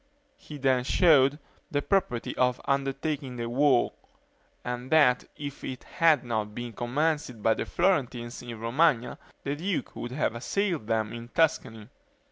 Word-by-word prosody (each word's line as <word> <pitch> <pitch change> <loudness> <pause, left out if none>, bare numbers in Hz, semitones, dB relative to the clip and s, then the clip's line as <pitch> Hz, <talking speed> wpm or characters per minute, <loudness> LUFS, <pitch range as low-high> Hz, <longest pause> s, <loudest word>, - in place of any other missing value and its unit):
He 150 - -10
then 130 -2 +2
showed 145 -2 +4 0.3
the 145 -4 -1
propriety 195 - 0
of 125 0 +1
undertaking 140 0 -1
the 120 -1 -3
war; 130 +1 +3 0.7
and 125 +1 -5
that 140 -6 +5
if 145 -1 -7
it 130 -1 -6
had 165 -3 +3
not 110 -3 -3
been 120 -1 -5
commenced 130 -2 -1
by 110 - +4
the - - -4
Florentines 130 -10 0
in 120 -2 -8
Romagna 125 +2 +1 0.2
the 140 +1 -2
duke 180 +4 -3
would 120 - -5
have 135 -3 0
assailed 165 - -2
them 110 -1 0
in 115 0 -7
Tuscany. 115 -7 0
130 Hz, 145 wpm, -28 LUFS, 120-150 Hz, 0.7 s, that